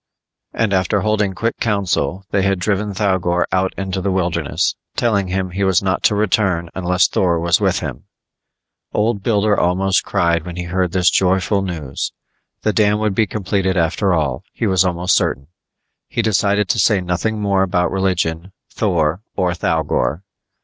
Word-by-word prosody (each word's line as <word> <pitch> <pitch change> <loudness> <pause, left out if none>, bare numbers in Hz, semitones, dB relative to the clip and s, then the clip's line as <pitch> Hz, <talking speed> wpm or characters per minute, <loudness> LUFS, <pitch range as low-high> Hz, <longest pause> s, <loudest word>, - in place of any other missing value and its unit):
And 110 -3 0
after 95 +2 +1
holding 105 -2 0
quick 115 +5 -2
council, 100 -3 -1
they 100 - +2
had 100 0 +1
driven 100 +3 -1
Thougor 95 -3 +1
out 95 0 +1
into 95 -1 -3
the 100 - -1
wilderness, 85 -5 0 0.2
telling 100 -5 +1
him 95 0 -2
he 100 +2 -2
was 95 -1 +2
not 95 0 0
to 105 - +4
return 95 -5 +1
unless 90 -1 +2
Thor 85 -3 +1
was 85 +1 +2
with - - +1
him. - - -6 0.9
Old 105 -1 +1
Builder 105 0 +2
almost 95 +2 +1
cried 85 -2 +1
when 90 0 -7
he 90 - -4
heard 90 0 -1
this 90 -1 +3
joyful 95 +2 +2
news. 80 -8 -4 0.5
The 110 - +1
dam 105 -1 +3
would 105 -1 0
be 110 +2 +2
completed 95 -2 -1
after 90 +4 +1
all, 75 -7 0
he - - -3
was 95 -4 +3
almost 90 0 0
certain. 70 +2 0 0.6
He 115 - -1
decided 105 -1 +1
to 115 - +1
say 100 +1 +4
nothing 90 +5 -2
more 100 -2 +1
about 90 -2 +1
religion, 90 -2 -1 0.2
Thor 85 -4 0
or 90 -2 +1
Thougor. 80 -2 -1
95 Hz, 165 wpm, -19 LUFS, 90-100 Hz, 0.9 s, to